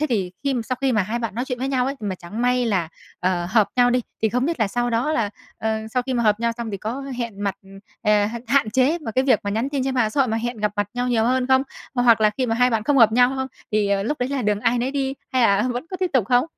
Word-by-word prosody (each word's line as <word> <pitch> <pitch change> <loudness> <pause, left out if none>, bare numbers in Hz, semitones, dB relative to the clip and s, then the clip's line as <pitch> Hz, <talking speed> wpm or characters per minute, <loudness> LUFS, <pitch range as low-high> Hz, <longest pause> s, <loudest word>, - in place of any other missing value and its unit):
thế 305 - +1
thì 195 -7 -1
khi 275 -1 +1
sau 255 +2 -2
khi 270 -1 +2
mà 215 -3 +2
hai 215 +6 -3
bạn 230 -5 -4
nói 240 +3 -2
chuyện 250 -2 -4
với 260 +2 -2
nhau 255 -2 +1
ấy, 275 - -2
mà 205 -3 -3
chẳng 185 +6 -6
may 250 0 +2
là, 190 -7 0 0.3
ờ, 180 -1 0
hợp 215 -2 +3
nhau 245 0 +5
đi, 250 +1 +2 0.2
thì 220 - +4
không 250 +4 0
biết 330 -6 -2
là 215 - +2
sau 240 +3 -1
đó 240 +7 0
là, 225 -8 0 0.3
ờ, 220 0 -1
sau 250 +2 0
khi 260 +1 -3
mà 235 - +1
hợp 210 0 +2
nhau 235 0 +1
xong, 235 -2 -4
thì 200 - -3
có 225 +7 -4 0.2
hẹn 230 -4 -4
mặt, 200 - 0 0.5
ờ, 210 -1 +3
h 230 +3 -4
hạn 270 -4 +3
chế 265 +9 +2
mà 270 -8 -6
cái 260 +4 +1
việc 255 -6 +3
mà 200 - -1
nhắn 225 +6 -1
tin 275 -3 -1
trên 265 0 -1
mạng 230 -4 +2
xã 280 - 0
hội, 265 - +3
mà 225 - 0
hẹn 240 +1 -3
gặp 210 -1 0
mặt 205 -1 0
nhau 245 +1 -1
nhiều 225 -2 +2
hơn 255 +1 +1
không? 265 0 +4 0.3
Hoặc 245 -3 +4
là 215 - +5
khi 255 +4 -2
mà 225 - 0
hai 250 +2 +3
bạn 225 -2 0
không 285 0 +3
hợp 220 -2 +6
nhau 245 +2 +4
không, 265 0 -2 0.2
thì 200 -2 +1
lúc 295 +7 -2
đấy 250 - -1
là 275 -2 -2
đường 210 -1 0
ai 240 +1 +2
nấy 250 +2 -1
đi 270 -1 -1 0.2
hay 255 -1 +3
là 200 -2 +4
vẫn 245 +6 -5
có 370 - -4
tiếp 370 - +1
tục 245 -7 +2
không? 245 +1 +3
240 Hz, 310 wpm, -22 LUFS, 215-255 Hz, 0.5 s, hợp